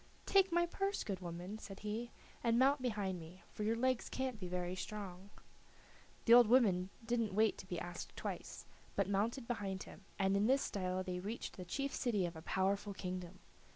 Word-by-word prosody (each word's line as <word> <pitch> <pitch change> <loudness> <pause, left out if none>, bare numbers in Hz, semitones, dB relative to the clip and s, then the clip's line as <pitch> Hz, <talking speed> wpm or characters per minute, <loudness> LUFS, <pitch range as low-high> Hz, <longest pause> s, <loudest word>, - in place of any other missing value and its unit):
"Take 385 -1 +5
my 345 0 +4
purse, 390 +3 -1
good 195 -4 -3
woman," 180 +4 -5
said 195 -3 -9
he, 215 +3 -3 0.3
"and 230 0 +3
mount 270 +2 +5
behind 205 -7 -1
me, 170 +2 -11
for - - -6
your 220 +2 +2
legs 255 +1 +1
can't 260 -4 -2
be 185 - -4
very 180 0 -2
strong." 195 -1 -6 1.0
The 230 - +8
old 240 -1 +9
woman 200 -7 +4 0.2
didn't 230 -4 0
wait 220 0 +4
to 190 - -9
be 175 -2 -3
asked 175 0 -6
twice, - - -5 0.3
but 200 -2 +2
mounted 225 +5 0
behind 200 -5 -2
him, 195 - -12
and 195 0 +3
in 205 +2 +3
this 270 +2 +4
style 185 -1 -1
they 180 -1 -3
reached 210 +6 -4
the 180 - -7
chief 275 +9 -2
city 215 -7 +1
of 170 -1 -4
a 160 - -7
powerful 195 +3 0
kingdom. 180 -1 -5
200 Hz, 190 wpm, -37 LUFS, 185-235 Hz, 1.0 s, old